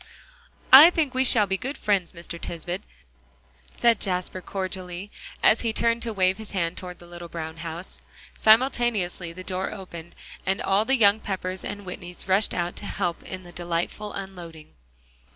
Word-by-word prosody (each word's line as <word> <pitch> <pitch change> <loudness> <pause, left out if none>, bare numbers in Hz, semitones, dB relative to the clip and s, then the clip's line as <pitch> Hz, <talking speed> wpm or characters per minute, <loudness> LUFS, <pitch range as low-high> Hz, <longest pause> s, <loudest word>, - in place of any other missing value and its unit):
"I 290 +6 +12
think 315 -6 0
we 260 0 +2
shall 225 -5 +6
be 195 -1 -1
good 270 +7 -5
friends, 195 -4 +1
Mr. 170 0 -8
Tisbett," 175 +3 -5 1.0
said 235 -1 +4
Jasper 185 -1 -2
cordially, 185 0 -5 0.3
as 220 - +5
he 230 - 0
turned 230 +1 +1
to 230 - -2
wave 190 -1 +1
his 220 -2 -9
hand 170 -2 -1
toward 180 -1 -8
the 175 - -14
little 175 0 -9
brown 160 -1 -6
house; 165 +2 -6 0.3
simultaneously 220 -7 +3
the 185 +2 -9
door 185 0 -3
opened, 170 -3 -9 0.3
and 190 +1 0
all 200 +3 +2
the 270 +2 +2
young 205 -2 +5
Peppers 185 -2 -4
and 205 0 -5
Whitneys 180 -1 -8
rushed 195 +3 +2
out 175 0 -2
to - - -5
help 175 -4 -2
in 185 0 -7
the 175 - -12
delightful 175 +4 -3
unloading. 175 - -9
185 Hz, 170 wpm, -25 LUFS, 175-210 Hz, 1.0 s, I